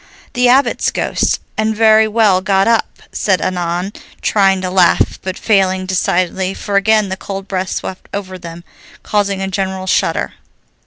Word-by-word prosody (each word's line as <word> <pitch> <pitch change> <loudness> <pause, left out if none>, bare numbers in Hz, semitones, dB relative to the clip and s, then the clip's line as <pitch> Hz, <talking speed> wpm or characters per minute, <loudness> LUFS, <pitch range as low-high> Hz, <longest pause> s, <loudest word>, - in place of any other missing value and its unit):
"The 245 0 +3
Abbot's 270 +3 +3
ghost, - - -1 0.2
and 220 0 0
very 220 0 +5
well 210 -4 +3
got 195 +1 +2
up," 230 -1 0
said 190 -3 0
Annon, 180 +2 -2 0.3
trying 195 -2 +3
to 185 -1 -3
laugh 180 -2 +2
but 185 0 -5
failing 190 -3 +1
decidedly, 185 0 -1
for 200 - -4
again 210 0 +3
the 190 - -2
cold 195 0 -7
breath 185 -1 -2
swept 185 - -6
over 190 -2 -6
them, 170 -1 -9 0.4
causing 200 -2 -1
a - - -2
general 190 -1 -3
shudder. - - 0
195 Hz, 155 wpm, -16 LUFS, 185-210 Hz, 0.4 s, very